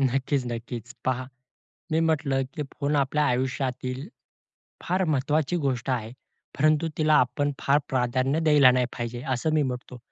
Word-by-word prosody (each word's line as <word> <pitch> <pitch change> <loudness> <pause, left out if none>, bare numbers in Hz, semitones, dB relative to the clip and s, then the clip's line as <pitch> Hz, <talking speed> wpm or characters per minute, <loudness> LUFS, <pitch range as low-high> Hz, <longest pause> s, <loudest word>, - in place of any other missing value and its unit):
नक्कीच 135 +1 +1
नक्कीच. 120 0 -6
पहा, 130 0 -1 0.7
मी 160 - +3
म्हटलं 145 -4 +1
की 150 - -3 0.2
फोन 145 +1 +1
आपल्या 145 +2 +1
आयुष्यातील 130 +1 -2 0.8
फार 185 +1 +1
महत्त्वाची 145 +4 0
गोष्ट 130 -1 -1
आहे. 115 -3 -2 0.5
परंतु 155 +2 +3
तिला 155 -1 +4
आपण 145 +4 -2
फार 140 +1 +3
प्राधान्य 130 +3 +1
द्यायला 145 -4 +7
नाही 125 -1 +2
पाहिजे, 120 0 -5
असं 155 +6 -1
मी 155 - +3
म्हटतो. 125 -1 -5
135 Hz, 140 wpm, -26 LUFS, 125-150 Hz, 0.8 s, द्यायला